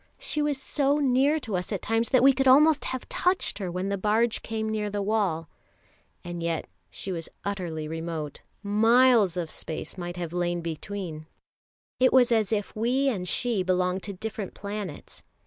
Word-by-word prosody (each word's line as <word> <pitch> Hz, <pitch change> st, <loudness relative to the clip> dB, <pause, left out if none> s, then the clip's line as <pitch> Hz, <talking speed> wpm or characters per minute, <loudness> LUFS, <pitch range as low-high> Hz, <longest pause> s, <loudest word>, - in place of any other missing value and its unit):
She 405 Hz, -11 st, -1 dB
was 295 Hz, -2 st, 0 dB
so 280 Hz, +1 st, +1 dB
near 275 Hz, +2 st, +3 dB
to 220 Hz, -6 st, -4 dB
us 180 Hz, +3 st, -3 dB
at 200 Hz, -, -3 dB
times 225 Hz, +1 st, +1 dB
that 255 Hz, -1 st, +4 dB
we 270 Hz, 0 st, +7 dB
could 270 Hz, 0 st, +1 dB
almost 295 Hz, +3 st, +6 dB
have 260 Hz, -1 st, -4 dB
touched 360 Hz, -7 st, 0 dB
her 190 Hz, -3 st, -3 dB
when 185 Hz, +3 st, -3 dB
the 200 Hz, -1 st, -2 dB
barge 220 Hz, +3 st, +1 dB
came 220 Hz, -1 st, -3 dB
near 215 Hz, -1 st, -1 dB
the 205 Hz, 0 st, -3 dB
wall; 195 Hz, -6 st, 0 dB, 0.8 s
and 175 Hz, -1 st, -6 dB
yet 165 Hz, -1 st, -1 dB, 0.2 s
she 195 Hz, -, -5 dB
was 165 Hz, -3 st, -4 dB, 0.2 s
utterly 175 Hz, -6 st, -3 dB
remote, 160 Hz, -2 st, -5 dB, 0.2 s
miles 225 Hz, -2 st, +4 dB
of 170 Hz, -3 st, -2 dB
space 160 Hz, +3 st, -6 dB
might 175 Hz, 0 st, -5 dB
have 170 Hz, -2 st, -4 dB
lain 175 Hz, -1 st, -1 dB
between; 165 Hz, -1 st, -6 dB, 0.7 s
it 255 Hz, 0 st, +5 dB
was 250 Hz, -2 st, +5 dB
as 220 Hz, -3 st, +2 dB
if 205 Hz, -2 st, -2 dB
we 250 Hz, +5 st, +1 dB
and 185 Hz, -7 st, -2 dB
she 230 Hz, +1 st, +2 dB
belonged 180 Hz, 0 st, 0 dB
to 200 Hz, -, -5 dB
different 205 Hz, 0 st, -6 dB
planets. 205 Hz, -1 st, -6 dB
205 Hz, 180 wpm, -27 LUFS, 175-245 Hz, 0.8 s, we